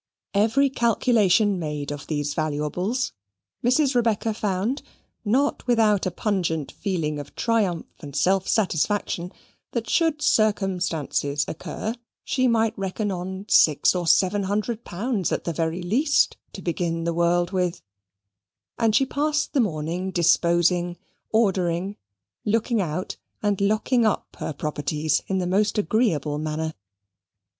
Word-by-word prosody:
Every 225 +7 +3
calculation 215 -5 +3
made 150 -3 -4
of 145 0 -7
these 145 -2 -2
valuables 155 - -1 0.5
Mrs. 260 +3 +3
Rebecca 225 -2 +1
found, 210 +5 -1 0.4
not 255 +6 +1
without 215 -5 +3
a - - +2
pungent 175 -6 -1
feeling 165 -7 -2
of 145 - -9
triumph 210 -8 0
and 140 -3 -9
self 190 0 +2
satisfaction, 185 -2 0 0.4
that 235 -2 -2
should 320 -3 +1
circumstances 180 - +1
occur, 175 +7 -4 0.3
she 255 -1 +1
might 225 -1 +2
reckon 195 +2 -2
on 190 +2 -5
six 150 -8 +5
or 175 -2 -2
seven 195 +4 +3
hundred 215 +4 -2
pounds 205 +1 -2
at - - -1
the 170 - -2
very 165 +3 -2
least, 275 - +2 0.2
to - - -8
begin 165 -1 -1
the 170 0 0
world 175 +1 +2
with; 180 -3 -1 1.0
and 225 -2 +3
she 270 - +4
passed 300 +3 -1
the 280 - +2
morning 175 -2 -1
disposing, 175 0 +2 0.3
ordering, 190 -3 +1 0.5
looking 225 +1 +1
out, 180 +1 -3 0.3
and 205 -2 +1
locking 215 +4 +2
up 215 - -1
her - - -3
properties 150 +1 -1
in 190 - 0
the 185 - 0
most 200 +5 +1
agreeable 180 - +1
manner. 155 +1 -3
190 Hz, 130 wpm, -24 LUFS, 165-220 Hz, 1.0 s, six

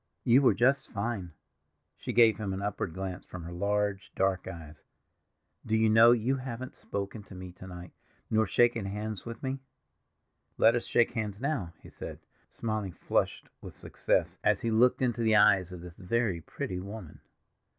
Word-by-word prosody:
"You 125 +4 +5
were 135 - +4
just 135 +3 +2
fine." 100 -4 -3 0.6
She - - -5
gave 115 -2 +5
him 100 -3 -2
an 95 - -4
upward 100 -5 -3
glance 95 -1 -5
from 90 -2 -9
her 85 - -7
large 100 +2 -1
dark 95 -1 0
eyes. 80 -4 -9 0.8
"Do 110 - 0
you 110 0 +3
know 115 +2 +8
you 120 +3 +2
haven't 130 -1 -6
spoken 100 +2 -5
to 95 - -12
me 90 0 -8
to 90 +1 -12
night, 90 -1 -9 0.4
nor 110 -1 +2
shaken 120 +1 +3
hands 105 +1 -5
with 115 -1 -7
me?" 135 0 -2 1.0
"Let 115 - +6
us 120 - -2
shake 120 - +3
hands 105 -3 -3
now," 130 - -2
he - - -13
said, - - -8 0.3
smiling, 110 -5 -3
flushed - - -1
with - - -10
success, - - -1
as - - +3
he 115 - -1
looked 125 +4 +4
into 120 -2 0
the 110 -1 +3
eyes 95 -3 +5
of 90 -2 -8
this 90 -1 -10
very 100 -2 0
pretty 90 +3 -5
woman. 100 +4 -8
105 Hz, 175 wpm, -30 LUFS, 95-115 Hz, 1.0 s, know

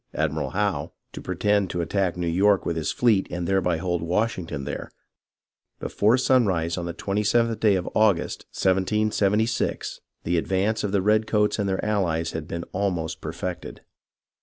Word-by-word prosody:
Admiral - - -1
Howe, - - -1 0.2
to - - -7
pretend 105 -2 +1
to 90 - -2
attack 90 +1 -1
New 90 - -2
York 95 +3 +3
with 85 - -1
his 80 -3 -1
fleet 110 -6 +2
and 90 -1 -3
thereby 90 -3 +1
hold 85 -1 -1
Wash 105 +7 0
ington 80 -6 -5
there, 75 - -5 0.9
before 110 +5 +2
sunrise 95 -11 +2
on 85 -1 -4
the - - -2
twenty 100 +4 -2
seventh 115 +1 +2
day 105 -3 +4
of 90 -1 -2
August, 105 -6 +1
1776, 105 +3 0 0.2
the 85 0 +1
advance 95 +5 0
of 105 - -1
the 100 -2 +1
redcoats 105 0 +2
and 100 -1 0
their 95 - -1
allies 85 -6 0
had 80 -2 -5
been 85 0 -4
almost 85 -5 -2
perfected. 85 +3 -5
95 Hz, 160 wpm, -25 LUFS, 85-105 Hz, 0.9 s, day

